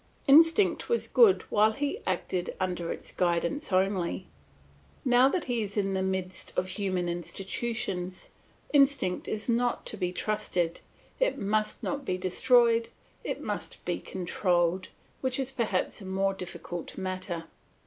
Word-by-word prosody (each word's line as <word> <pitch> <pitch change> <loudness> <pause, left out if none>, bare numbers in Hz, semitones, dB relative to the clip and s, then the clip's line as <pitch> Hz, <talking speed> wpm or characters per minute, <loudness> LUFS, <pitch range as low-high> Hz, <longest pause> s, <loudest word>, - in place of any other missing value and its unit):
Instinct 325 +7 +5
was 470 - +1
good 450 -6 +5
while 215 +1 +4
he 290 - -2
acted 180 -2 -2
under 180 -2 -2
its - - -6
guidance 175 - 0
only; 185 - +1 0.8
now 250 +1 +6
that 360 +3 -1
he 245 -3 -1
is 205 0 -4
in 195 -1 +1
the 190 - 0
midst 190 -1 -2
of 185 - 0
human 185 -4 -1
institutions, 185 +2 -3 0.4
instinct 275 -10 +3
is 215 0 -3
not 240 0 +1
to 215 - -3
be 180 -2 -1
trusted; 180 -4 -1 0.4
it - - +2
must 215 +2 -1
not 285 0 -2
be 185 -8 -1
destroyed, 230 +5 +3 0.3
it - - -3
must - - -5
be - - -1
controlled, 180 0 0 0.3
which 260 -1 0
is 270 -1 -2
perhaps 215 -6 -1
a - - -8
more 195 +1 +1
difficult 175 -2 -6
matter. 185 -2 -3
195 Hz, 140 wpm, -29 LUFS, 180-245 Hz, 0.8 s, now